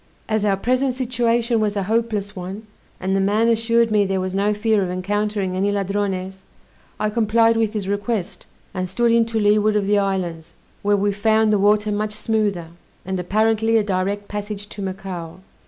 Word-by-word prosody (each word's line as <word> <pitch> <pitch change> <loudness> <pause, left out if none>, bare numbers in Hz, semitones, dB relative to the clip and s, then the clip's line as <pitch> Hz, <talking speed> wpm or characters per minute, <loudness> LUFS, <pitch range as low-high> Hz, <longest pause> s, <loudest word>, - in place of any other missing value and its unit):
As 215 -1 0
our 200 -2 +2
present 255 +4 0
situation 240 -2 +1
was 210 -1 0
a 200 - 0
hopeless 215 -1 -1
one, 190 +4 -7 0.3
and 190 +1 -1
the - - +2
man 205 +4 +2
assured 230 0 +2
me 210 -1 +4
there 195 -1 -1
was 185 0 -3
no 200 +2 +1
fear 210 0 +1
of 185 - -1
encountering 200 +1 -1
any 195 +2 +1
Ladrones, 195 -1 -2 0.6
I 210 0 0
complied 230 +1 +3
with 225 -1 0
his 205 -3 -3
request, 205 -1 -3 0.3
and 185 -2 -3
stood 235 +5 +2
in 230 0 +3
to 225 -1 -1
leeward 210 0 +3
of 205 -2 +1
the 205 +1 +3
islands, 180 -5 -3 0.3
where 205 0 +2
we 205 +1 +1
found 220 +1 +2
the 205 - +3
water 210 +1 +3
much 210 +1 -2
smoother, 210 -6 -1 0.4
and 190 0 -2
apparently 220 +4 +2
a 220 - +2
direct 200 +1 -2
passage 205 0 -6
to 205 - -8
Macao. 185 -3 -6
205 Hz, 185 wpm, -21 LUFS, 195-220 Hz, 0.6 s, me